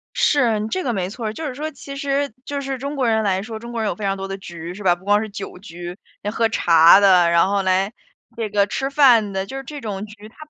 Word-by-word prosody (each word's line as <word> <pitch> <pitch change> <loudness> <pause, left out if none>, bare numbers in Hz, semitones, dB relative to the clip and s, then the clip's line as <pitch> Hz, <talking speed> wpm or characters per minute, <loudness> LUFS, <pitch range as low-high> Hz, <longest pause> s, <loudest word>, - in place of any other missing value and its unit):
是， 230 -7 +2
这 370 +10 -2
个 250 - -1
没 185 -3 -2
错 225 +3 -7
儿， 215 - -3
就 320 - -6
是 260 - -6
说 305 +3 -4
其 275 -1 -10
实 280 -2 -1
就 285 0 -3
是 270 -1 -4
中 280 +3 -5
国 260 -3 0
人 220 -1 +2
来 190 -2 +1
说， 220 +1 -7
中 235 +1 -9
国 235 -1 -3
人 215 - 0
有 - - -3
非 215 - -8
常 195 0 0
多 195 0 -5
的 195 0 -5
局， 170 -2 -8
是 205 +3 -9
吧？ 180 -2 +4
不 180 +2 -20
光 205 +1 +3
是 220 - -5
酒 200 -2 -8
局， 175 -2 -8 0.4
喝 225 -1 +1
茶 170 -3 +6
的， 185 -4 +5
然 170 +1 +4
后 200 0 0
来 190 +3 +1 0.4
这 225 -2 -3
个 205 -1 +2
吃 270 +6 -2
饭 250 -7 +5
的， 190 0 -2
就 265 - -9
是 270 - -6
这 295 +2 -8
种 210 -4 -5
局， 210 0 -13
它 220 - -20
210 Hz, 290 characters per minute, -21 LUFS, 195-255 Hz, 0.4 s, 茶